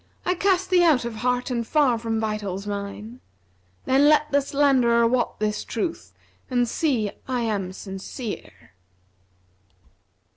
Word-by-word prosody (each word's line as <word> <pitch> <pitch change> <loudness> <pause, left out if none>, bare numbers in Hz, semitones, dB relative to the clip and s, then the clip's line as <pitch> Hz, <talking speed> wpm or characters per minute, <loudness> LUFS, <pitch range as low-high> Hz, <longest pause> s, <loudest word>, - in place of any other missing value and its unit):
I 360 - +2
cast 375 0 +1
thee 360 -1 +5
out 295 -8 +4
of 235 -2 -5
heart 250 +2 -1
and 240 -1 0
far 275 -7 +3
from 225 -1 -2
vitals 210 -3 -3
mine; 205 +4 -6 0.3
* 90 0 -38
Then 275 +3 +4
let 300 0 +3
the 285 0 +3
slanderer 265 -5 +3
wot 240 +1 0
this 210 0 -1
truth 330 +9 -4 0.4
and 245 -2 +1
see 230 -7 0 0.2
I 255 -2 -1
am 205 -5 -2
sincere.' 190 - -8
235 Hz, 140 wpm, -24 LUFS, 210-275 Hz, 0.4 s, thee